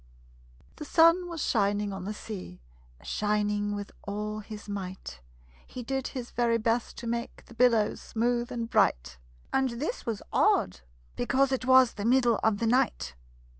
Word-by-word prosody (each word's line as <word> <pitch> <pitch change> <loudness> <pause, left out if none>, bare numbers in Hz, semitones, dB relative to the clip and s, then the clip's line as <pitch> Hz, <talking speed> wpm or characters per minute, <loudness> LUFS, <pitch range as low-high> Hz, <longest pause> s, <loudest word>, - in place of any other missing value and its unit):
The - - -6
sun 335 +4 +4
was 335 -3 -4
shining 205 -2 +1
on 190 -1 -6
the 210 - -3
sea, 185 - -8 0.4
Shining 210 0 0
with 205 0 -6
all 210 +1 -4
his 215 0 -9
might; 190 - -6 0.5
He 250 - -7
did 265 +2 -2
his 250 -3 -6
very 235 -1 +2
best 230 +1 -1
to 235 - -7
make 235 +1 -4
The - - -15
billows 230 -3 +3
smooth 240 +2 -1
and 235 -2 -3
bright - - +1 0.3
And 265 -1 +2
this 315 - -3
was 220 -3 -3
odd, - - +2 0.4
because 270 - +1
it 260 -1 -1
was 260 -2 +6
The 205 - -5
middle 240 -2 +3
of 220 -2 +2
the 230 - -1
night. 230 - +1
225 Hz, 160 wpm, -28 LUFS, 205-250 Hz, 0.5 s, was